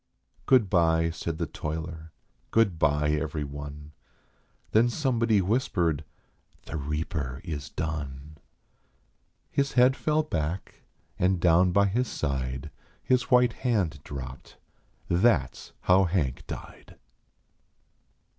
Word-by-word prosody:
Good 125 -6 +5
bye," 85 -3 +3
said 80 0 -4
the 85 - -1
toiler; 80 +1 -6 0.4
"good 100 -7 +2
bye 75 -1 +2
every 75 0 -1
one." 75 +1 -8 0.8
Then 115 +3 +4
somebody 115 -6 +2
whispered: 90 - 0 0.3
" - - -36
The - - -6
reaper 75 -3 -3
is 75 -3 -5
done." 75 -2 -5 1.1
His 140 0 0
head 125 +1 +5
fell 155 +1 +1
back, 85 - -4 0.4
and 90 0 +2
down 90 +1 +4
by 100 +2 +4
his 120 +6 0
side 65 -1 -3 0.3
His 125 -2 +1
white 125 -2 +5
hand 100 - 0
dropped. 65 -2 -8 0.5
That 100 +7 +3
s - - -12
how 95 +1 +4
Hank 80 -8 -1
died. - - -9
85 Hz, 115 wpm, -27 LUFS, 75-110 Hz, 1.1 s, Good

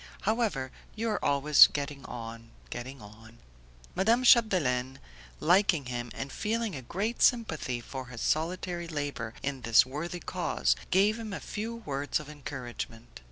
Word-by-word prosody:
However 205 - 0 0.2
you 225 +1 -1
are 210 - -2
always 145 +1 +7
getting 140 -1 -4
on, 115 -1 -8 0.2
getting 125 +1 -7
on." 110 +2 -14 0.6
Madame 230 +6 +3
Chapdelaine, 145 - +4 0.4
liking 175 -3 +3
him, 120 -1 -4
and 135 0 -5
feeling 225 -1 -1
a 130 - -5
great 200 - -3
sympathy 160 - +2
for 130 +1 -7
his 125 -2 -8
solitary 170 +2 -1
labour 145 -7 -4
in 140 -2 -3
this 115 0 +5
worthy 155 +7 -5
cause, 65 - 0
gave 205 +4 +3
him 220 -3 -6
a - - -4
few 225 +2 -5
words 145 -10 -2
of 150 -1 -10
encouragement. 120 -5 -7
145 Hz, 145 wpm, -29 LUFS, 125-200 Hz, 0.6 s, always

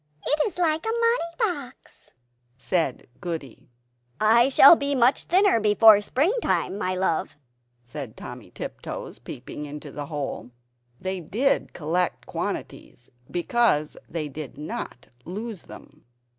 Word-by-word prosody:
It 300 - +1
is 405 - -7
like 320 -3 +1
a 445 - -2
money 465 -7 +1
box!" 315 - -4 0.5
said 160 -1 -1
Goody. 160 -8 -6 0.5
"I 230 +4 +5
shall 275 +4 +9
be 280 -2 -1
much 250 +1 +3
thinner 375 - +4
before 210 0 +6
springtime, 310 - 0
my 185 -2 -1
love," 185 -5 -1 0.5
said 125 -1 -8
Timmy 125 -2 -9
Tiptoes, - - -7
peeping 145 +4 -8
into 145 0 -8
the 145 -1 -6
hole. 145 -5 -5 0.5
They 190 0 -3
did 225 - 0
collect 175 +3 -1
quantities 120 - -6 0.2
because 175 -4 +1
they 155 -2 -3
did 145 -2 -8
not 150 - -6
lose 205 - -6
them! 150 +2 -14
190 Hz, 125 wpm, -25 LUFS, -, 0.5 s, shall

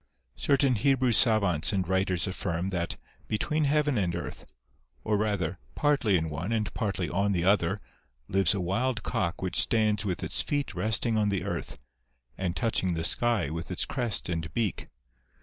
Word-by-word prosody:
Certain 140 -2 +3
Hebrew 130 +2 +2
savants 100 - +4
and 95 -4 -1
writers 95 -1 +1
affirm, 95 -1 -2
that 85 -2 -2 0.3
be 110 - 0
tween 150 +6 0
heaven 145 -3 +2
and 90 -3 0
earth, 85 - -6 0.6
or 110 - +1
rather, 100 -5 -1 0.2
partly 140 -10 +2
in 80 -1 -2
one 80 +7 -4
and 110 -2 -1
partly 100 -6 -2
on 100 +5 0
the 85 -2 0
other, 95 0 +2 0.5
lives 95 0 +3
a - - -1
wild 110 +7 -1
cock 85 0 -2
which 90 - +1
stands 110 -2 +1
with 95 -4 -3
its - - 0
feet 145 -1 -2
resting 110 +1 0
on 105 -1 +2
the 100 -2 -1
earth, - - -4 0.6
and 90 +2 -2
touching 95 -6 0
the 80 - -2
sky 105 -6 +2
with 80 +1 -5
its 90 - 0
crest 120 -6 -1
and 80 -2 -3
beak. 110 -5 -1
100 Hz, 170 wpm, -28 LUFS, 90-115 Hz, 0.6 s, savants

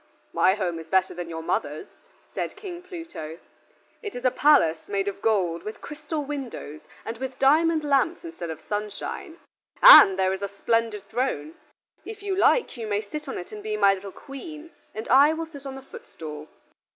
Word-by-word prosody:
"My 190 +1 +4
home 175 -5 -2
is 165 - -10
better 190 +2 +2
than 175 -1 -6
your 165 -1 -6
mother's," 150 -1 -2 0.5
said - - -4
King 380 -4 -8
Pluto. 330 - -8 0.6
"It 420 -4 -7
is 245 - -6
a 255 - +4
palace 170 - +3
made 200 -1 -1
of 200 0 -4
gold, 185 -7 +1
with 215 +4 -7
crystal 300 0 -5
windows 260 - -6 0.2
and 225 0 -6
with 260 0 -5
diamond 315 +3 +3
lamps 290 +5 +1
instead 330 - -7
of 160 -1 -7
sunshine; 210 +10 -5 0.4
and 200 - +10
there 190 0 +2
is 190 - -5
a 200 - -1
splendid 215 +1 -1
throne; 220 - -2 0.5
if 425 -2 -9
you 395 -2 -1
like 460 - +3
you 225 -2 -5
may 205 0 0
sit 300 +9 -7
on 265 - -4
it 175 - -8
and 210 -1 -8
be 215 0 -3
my 200 -1 +5
little 195 0 -7
Queen, 305 - -10 0.2
and 220 +1 -5
I 280 +5 +6
will 325 +1 -4
sit 285 -4 -11
on 265 - -6
the 270 - -10
footstool." 160 - -10
230 Hz, 190 wpm, -25 LUFS, 190-305 Hz, 0.6 s, and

